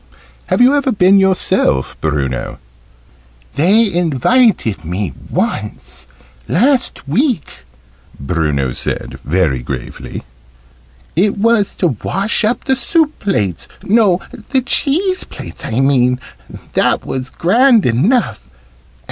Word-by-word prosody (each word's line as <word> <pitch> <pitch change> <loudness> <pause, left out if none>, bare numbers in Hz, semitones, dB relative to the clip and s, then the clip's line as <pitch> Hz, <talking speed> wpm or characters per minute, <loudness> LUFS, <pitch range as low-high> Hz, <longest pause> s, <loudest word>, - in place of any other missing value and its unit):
"Have - - +1
you 255 +3 +6
ever 280 -2 +1
been 195 -2 +4
yourself, 190 - +1
Bruno?" 70 -5 -2 1.0
"They 200 +7 +3
invited 170 - +1
me 90 +3 -3 0.2
once, 65 +1 -4 0.4
last 250 - +1
week," 235 - -1 0.6
Bruno 70 -3 -1
said, - - -4
very 75 -4 0
gravely. 60 0 -7 0.9
"It 200 +5 +1
was 220 -1 +2
to 175 - +1
wash 200 +4 0
up 220 +3 0
the 265 - +1
soup 310 +4 +1
plates 105 - -2 0.2
no, 205 -4 +3 0.3
the 265 -2 +2
cheese 355 +9 0
plates - - -9
I 115 +4 -1
mean 125 -2 +2 0.5
that - - +1
was 130 0 -4
grand 230 - +3
enough. 180 - +1
180 Hz, 105 wpm, -15 LUFS, -, 1.0 s, you